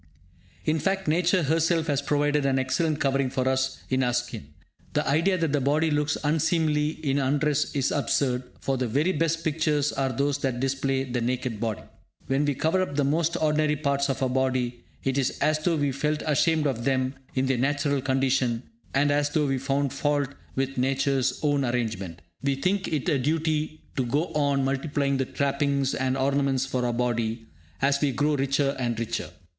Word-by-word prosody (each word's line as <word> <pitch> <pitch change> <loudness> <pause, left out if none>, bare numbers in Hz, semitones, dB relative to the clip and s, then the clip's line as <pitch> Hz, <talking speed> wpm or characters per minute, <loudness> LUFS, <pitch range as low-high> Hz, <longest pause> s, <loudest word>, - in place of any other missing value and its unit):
In 155 0 +1
fact, 195 +3 -1
Nature 175 +3 +2
herself 165 +2 +2
has 145 -3 0
provided 145 0 +1
an 135 -1 +2
excellent 150 +4 0
covering 135 -1 +1
for 130 0 -1
us 130 0 0
in 130 0 +1
our 125 -1 +1
skin. 120 - -3 0.5
The - - 0
idea 165 +7 +2
that 165 -4 0
the 145 - +2
body 150 +4 +2
looks 150 0 +1
unseemly 155 0 +1
in 135 +1 +2
undress 145 +2 +1
is 135 -2 +1
absurd, 135 -3 +1 0.2
for 135 -1 0
the 125 - 0
very 145 +10 +1
best 165 -2 0
pictures 150 -2 +1
are 135 -1 0
those 140 +3 0
that 130 -3 -1
display 135 0 0
the 125 -2 -3
naked 125 -2 -2
body. 110 -2 -2 0.4
When 135 +2 +1
we 145 -1 0
cover 160 +7 +1
up 165 -6 -2
the 145 - +2
most 160 +4 +1
ordinary 150 -1 +2
parts 140 -1 0
of 135 0 -1
our 130 - +1
body, 125 -2 -1 0.2
it 135 +1 0
is 130 - -1
as 155 0 +2
though 165 +2 +1
we 145 -2 +1
felt 150 +3 -1
ashamed 155 +1 +2
of 125 -5 -1
them 130 0 +1 0.2
in 130 0 +1
their 130 -2 +1
natural 145 +1 +1
condition, 130 -3 +1 0.3
and 145 +1 +3
as 145 0 +2
though 150 0 +1
we 135 -2 0
found 140 +1 0
fault 145 -1 0 0.3
with 135 0 -1
Nature's 135 0 +1
own 145 -2 +2
arrangement. 110 - -3 0.2
We 140 0 +1
think 185 +7 0
it 150 -5 -2
a 150 -6 +2
duty 155 +2 -1
to 130 - +1
go 150 +8 0
on 140 -2 +1
multiplying 140 0 0
the 135 - 0
trappings 140 0 0
and 130 0 0
ornaments 135 -1 +1
for 125 -2 -1
our - - 0
body, 115 -1 -1 0.4
as 140 0 +3
we 145 -2 +2
grow 145 +4 +1
richer 135 0 +1
and 120 -3 -1
richer. 115 0 -3
140 Hz, 190 wpm, -26 LUFS, 130-150 Hz, 0.5 s, and